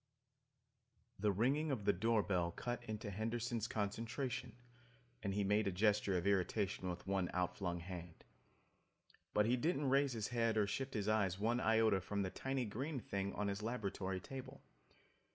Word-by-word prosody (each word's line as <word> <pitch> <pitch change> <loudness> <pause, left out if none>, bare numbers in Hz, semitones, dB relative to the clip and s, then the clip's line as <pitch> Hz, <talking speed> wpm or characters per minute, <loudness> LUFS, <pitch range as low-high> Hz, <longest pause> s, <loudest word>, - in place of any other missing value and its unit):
The 105 +1 +3
ringing 135 +10 +2
of 120 -8 -1
the 100 - +5
door 110 +3 +2
bell 90 -4 +1
cut 120 +7 -4
into 105 -1 -4
Henderson's 115 +2 -1
concentration 115 +4 -2 0.7
and 100 -3 -1
he 100 - +2
made 105 +2 +3
a - - +2
gesture 100 0 +3
of 90 - -2
irritation 100 -1 +1
with 90 - -5
one 95 -2 0
outflung 90 -1 -1
hand. 85 -1 -8 1.1
But 105 - +5
he 120 +3 +3
didn't 145 0 +1
raise 140 -1 +4
his 110 -2 -2
head 115 -2 +1
or 105 - +4
shift 135 +6 -3
his 105 -1 -1
eyes 100 -4 +2
one 115 +4 +1
iota 110 -4 +4
from 100 +2 -1
the 95 - -2
tiny 135 -1 -1
green 130 +7 -3
thing 100 -2 -2
on 105 - 0
his 100 +1 -2
laboratory 100 -5 -2
table. 130 +7 -8
105 Hz, 165 wpm, -39 LUFS, 100-120 Hz, 1.1 s, the